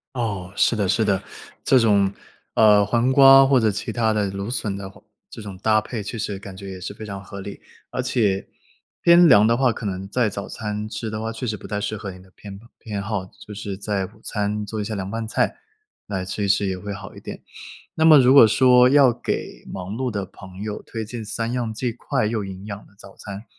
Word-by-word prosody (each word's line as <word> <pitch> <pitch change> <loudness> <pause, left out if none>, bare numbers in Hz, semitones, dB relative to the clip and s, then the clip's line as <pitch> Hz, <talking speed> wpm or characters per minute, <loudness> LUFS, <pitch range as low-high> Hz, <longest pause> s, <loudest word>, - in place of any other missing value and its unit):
哦， 100 -7 -3
是 - - +3
的， 100 -3 0
是 110 +4 +2
的。 100 -3 +1 0.4
这 130 - +5
种， 100 -4 +3 0.4
呃， 105 -2 +6
黄 120 +5 +1
瓜 135 0 +8
或 135 -2 +4
者 110 -1 +3
其 105 - -4
他 110 -2 +1
的 105 -2 0
芦 100 +2 -5
笋 105 -5 -2
的 100 -1 -7
黄 95 - -18 0.3
这 110 - -9
种 100 -3 -8
搭 110 +1 +3
配 110 0 -6
确 110 +3 -6
实 105 -2 -3
感 95 -1 -10
觉 100 0 -8
也 95 -1 -8
是 100 - -6
非 110 - -9
常 100 -2 -7
合 100 0 -9
理。 100 +1 -8 0.3
而 130 - -2
且 110 -7 0 0.5
偏 170 0 +7
凉 110 -5 +7
的 115 +1 +3
话 130 -1 +3
可 115 - -8
能 95 0 -4
在 120 0 +1
早 100 +1 -6
餐 105 -1 -5
吃 110 0 -5
的 110 0 -4
话， 110 0 -3
确 120 +3 -5
实 110 -1 -2
不 - - -11
太 105 0 -3
适 110 +1 -3
合 100 -1 -6
你 90 0 -12
的 95 - -20
偏 100 -2 -10 0.2
偏 105 -3 -5
好， 100 -2 -3
就 105 - -14
是 100 -1 -5
在 100 -1 -2
午 - - -19
餐 105 0 -2
做 105 +1 -5
一 - - -2
下 110 0 -4
凉 95 -1 -4
拌 115 +1 -4
菜， - - 0 0.5
来 95 -2 -3
吃 100 +2 -4
一 - - -1
吃 100 0 +2
也 95 -1 -2
会 100 +2 -6
好 95 - -9
一 - - -11
点。 - - -9 0.5
那 160 - +1
么 155 -2 +9
如 130 0 +5
果 135 -5 +9
说 125 +2 +5
要 135 -2 +5
给 - - -5
忙 95 +2 -6
碌 130 +1 -2
的 100 -2 -3
朋 95 +1 -12
友 105 -1 -5
推 110 -1 -6
荐 115 0 -7
3 115 +2 -3
样 120 -3 -2
既 120 +1 -2
快 110 - -2
又 110 -2 -2
营 95 0 -8
养 100 -1 -6
的 100 - -24
早 100 - -14
餐， 100 +1 -8
105 Hz, 255 characters per minute, -22 LUFS, 100-115 Hz, 0.5 s, 么